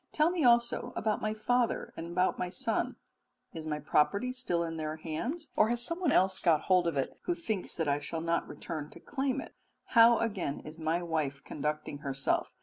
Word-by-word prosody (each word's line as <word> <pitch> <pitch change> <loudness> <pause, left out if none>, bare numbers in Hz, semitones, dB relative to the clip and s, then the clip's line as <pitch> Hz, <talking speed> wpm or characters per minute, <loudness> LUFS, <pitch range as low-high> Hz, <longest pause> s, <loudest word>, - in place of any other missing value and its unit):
Tell 310 +3 +3
me 350 -4 0
also 235 0 +3
about 215 -1 0
my 215 0 -1
father 245 +2 0
and 170 +1 -6
my 180 0 +1
son? 225 +6 -1 0.6
Is 160 -1 -6
my 150 -1 -1
property 150 - +2
still 250 -10 -1
in 165 -1 -4
their 155 0 -3
hands, 200 - -4
or 215 - +4
has 240 0 +1
someone 340 +1 0
else 190 +1 +3
got 165 -4 +3
hold 180 -2 +3
of 165 -4 -1
it 135 - -2
who 350 - +1
thinks 220 - -3
that 160 -2 -1
I 145 0 +2
shall 150 +2 -4
not 170 +1 0
return 155 -3 -6
to - - -11
claim 270 -1 -1
it? - - -8 0.4
How, 230 0 +8
again, 195 -11 -2
is 155 +2 -10
my 165 +2 0
wife 155 -5 -2
conducting 150 0 -3
herself? 135 -3 -1
180 Hz, 195 wpm, -31 LUFS, 155-235 Hz, 0.6 s, How